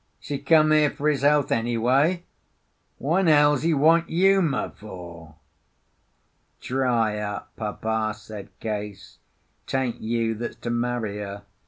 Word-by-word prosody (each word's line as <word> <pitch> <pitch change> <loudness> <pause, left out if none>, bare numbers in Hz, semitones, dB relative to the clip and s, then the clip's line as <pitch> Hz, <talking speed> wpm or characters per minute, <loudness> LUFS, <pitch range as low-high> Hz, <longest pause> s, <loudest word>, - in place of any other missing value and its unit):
's - - -14
he 140 -2 -2
come 155 +2 +4
here 155 -1 +4
for 145 - -3
his 140 -3 0
health, 145 0 +3
anyway? 125 +9 +1 0.7
Wha' 155 +7 0
'n 190 - +1
hell's 145 -3 +5
he 165 - +1
want 165 +3 +3
Uma 180 -4 +2
for?" 85 -6 -11 1.2
"Dry 120 -5 0
up, 105 -1 -5
Papa," 110 0 -2
said 105 -1 -10
Case. 105 -2 -6 0.5
"'Tain't 130 -3 -2
you 115 0 -1
that's 115 +2 -5
to 120 - -5
marry 120 -3 -2
her. 100 0 -7
120 Hz, 135 wpm, -24 LUFS, 110-150 Hz, 1.2 s, hell's